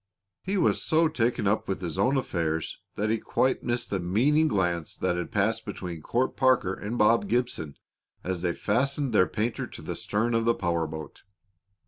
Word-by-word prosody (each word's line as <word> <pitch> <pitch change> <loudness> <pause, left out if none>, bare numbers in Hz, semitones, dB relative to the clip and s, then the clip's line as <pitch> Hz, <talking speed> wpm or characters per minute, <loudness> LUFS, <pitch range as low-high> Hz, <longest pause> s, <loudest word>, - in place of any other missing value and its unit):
He 195 +2 -2
was 180 - +2
so 160 +1 +3
taken 120 -8 0
up 100 +2 +1
with 95 - -2
his 85 -5 -4
own 135 +2 +3
affairs 80 -10 -2 0.2
that 105 +1 0
he 115 - +1
quite 130 +4 +1
missed 120 0 -2
the 100 - 0
meaning 130 - +3
glance 90 - -1
that 90 0 -1
passed 110 +2 +1
between 90 -6 -6
Court 125 +10 0
Parker 130 -8 +3
and 105 +5 -4
Bob 105 -1 +4
Gibson 120 - -1 0.5
as 90 -1 -2
they 90 -1 0
fastened 135 - 0
their 90 -3 +5
painter 115 +2 -2
to - - -10
the - - -4
stern 110 +3 -1
of 115 0 +1
the 115 0 +3
power 85 -3 0
boat. 80 0 -8
105 Hz, 180 wpm, -27 LUFS, 90-125 Hz, 0.5 s, their